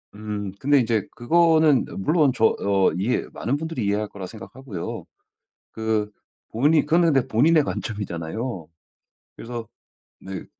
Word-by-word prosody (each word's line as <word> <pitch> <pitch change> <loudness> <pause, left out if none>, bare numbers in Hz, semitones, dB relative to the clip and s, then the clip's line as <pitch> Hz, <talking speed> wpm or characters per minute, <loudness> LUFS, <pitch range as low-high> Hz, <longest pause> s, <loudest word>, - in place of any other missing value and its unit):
음 105 -2 -5
근데 145 0 +4
인제 115 -4 0
그거는 160 +1 +4
물론 150 - +3
저 110 - +4
어 100 -1 +3
이해 115 +7 0
많은 130 +7 -1
분들이 160 -8 -4
이해할 105 +1 0
거라 100 -2 -8
생각하고요. 110 -1 -7 0.7
그 110 -1 -1 0.4
본인 145 +6 +3
그거는 165 0 +3
근데 135 -1 +2
본인의 150 +7 +4
관점이잖아요. 95 0 -4 0.7
그래서 115 -1 -7 0.5
네. 95 -2 -7
115 Hz, 285 characters per minute, -23 LUFS, 105-145 Hz, 0.7 s, 근데